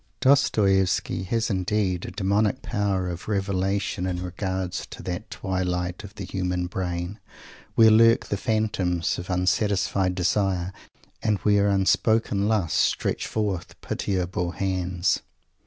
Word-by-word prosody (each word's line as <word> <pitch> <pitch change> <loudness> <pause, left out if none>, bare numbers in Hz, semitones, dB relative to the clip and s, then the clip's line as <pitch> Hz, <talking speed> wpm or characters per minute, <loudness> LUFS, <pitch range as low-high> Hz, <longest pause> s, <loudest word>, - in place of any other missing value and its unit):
Dostoievsky 95 -8 +3
has, 115 +1 0
indeed, 95 -1 0
a - - -4
demonic 100 +6 0
power 100 -5 -1
of 90 0 -6
revelation 95 -2 -1
in 90 -1 -2
regard 95 0 -3
to 95 - -7
that - - -5
twilight 90 0 -2
of 105 +1 -11
the 100 - -6
human 90 -1 -2
brain, 90 +2 -4 0.6
where 110 -1 +7
lurk 115 +1 +5
the - - -2
phantoms 100 -7 0
of 90 - -7
unsatisfied 95 0 +1
desire, 95 0 0 0.5
and 105 -1 +1
where 100 -1 +3
unspoken 100 +1 +2
lusts 105 -7 +1
stretch - - 0
forth 100 -5 -3
pitiable 90 -2 -2
hands. 90 -1 0
95 Hz, 125 wpm, -25 LUFS, 90-105 Hz, 0.6 s, where